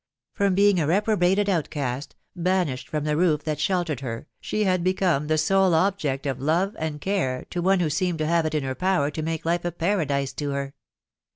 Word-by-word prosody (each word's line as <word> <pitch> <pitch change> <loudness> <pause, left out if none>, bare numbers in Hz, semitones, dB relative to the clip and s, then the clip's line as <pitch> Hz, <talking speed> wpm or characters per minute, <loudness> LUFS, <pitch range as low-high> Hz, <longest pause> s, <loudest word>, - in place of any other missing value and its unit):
From 200 -2 +1
being 200 -1 +4
a 150 - +1
reprobated 200 +1 +2
outcast, 145 -7 -2 0.2
banished 180 -7 -1
from 150 -3 -2
the 150 0 0
roof, 155 -3 +2
that 150 -1 -2
shel 180 +2 +1
tered 150 -6 -3
her, 120 -1 -5
she 215 - -1
had 185 -3 +1
become 180 -5 +1
the 155 0 +2
sole 190 +2 +3
object 160 -7 0
of 135 -2 -2
love 170 +8 +1
and 155 -2 -3
care 145 -8 -1
to 175 - -2
one 190 +1 +3
who 165 - +1
seemed 175 +2 0
to 155 - -1
have 165 0 +2
it 155 - -3
in 150 - 0
her 130 -1 -2
power 180 -3 +1
to 155 - -4
make 160 0 -3
life 170 +1 0
a 175 - -1
paradise 160 -6 -1
to 145 -1 -3
her. 140 0 -3
165 Hz, 210 wpm, -24 LUFS, 145-185 Hz, 0.2 s, being